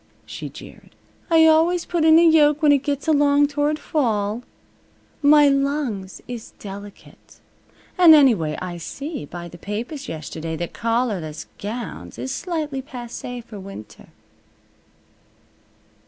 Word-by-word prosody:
she - - -7
jeered. - - -14 0.3
"I 325 -1 +6
always 325 +2 +3
put 340 -2 -1
in 320 0 +7
a 335 - +6
yoke 305 -1 +4
when 295 - +6
it 285 - +5
gets 285 +1 -3
along 290 -1 +4
toward 295 +1 0
fall. 220 -8 -1 0.8
My 295 0 +6
lungs 275 -9 -1
is 240 -3 -8
delicate. 200 0 -12 0.6
And 335 -3 +9
anyway, 215 - +3
I 180 -1 -5
see 280 - -6
by 175 +3 -8
the 175 0 -13
papers 240 - -5
yesterday 160 +1 -5
that 170 +1 -5
collarless 220 -9 -2
gowns 205 - -6
is 125 +2 -4
slightly 310 -6 -3
passay 245 -2 -7
f'r 210 -4 -10
winter." 190 - -11
255 Hz, 125 wpm, -22 LUFS, 195-300 Hz, 0.8 s, And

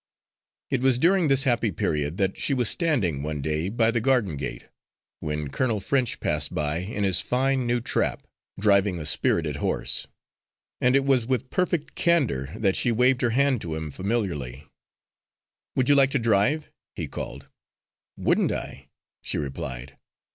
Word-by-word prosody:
It 130 - +1
was 130 -2 +3
during 175 +4 +3
this 135 -1 +4
happy 120 -5 +1
period 75 -1 -1
that 95 -1 0
she 140 - -1
was 125 -3 +1
standing, 115 - 0
one 75 0 -3
day, 75 +5 -1
by 115 +1 +3
the 115 -1 0
garden 115 - +2
gate, 70 - -5 0.5
when 75 -1 -3
Colonel 110 - 0
French 125 +4 0
passed - - -1
by 75 +1 0
in 100 +3 -3
his 95 -2 +3
fine 130 +3 0
new 120 0 +1
trap, - - -1 0.3
driving 100 -2 +3
a 80 - -6
spirited 75 -1 0
horse; - - -1 0.7
and 125 +1 +3
it 140 0 +3
was 130 -4 +2
with 130 0 -1
perfect 175 -4 -1
candour 130 - +1
that 100 -3 +1
she 120 - +2
waved 125 +2 +3
her 120 - +2
hand 130 0 +2
to 80 -2 -4
him 80 -1 -5
familiarly. 80 - -3 1.1
"Would 130 -1 +1
you 145 - +6
like 135 0 +4
a - - +5
drive?" 115 +6 +2 0.2
he - - -4
called. 70 +3 -7 0.7
"Wouldn't - - +2
I?" - - -6 0.3
she - - -3
replied. 65 -2 -6
110 Hz, 160 wpm, -25 LUFS, 80-130 Hz, 1.1 s, you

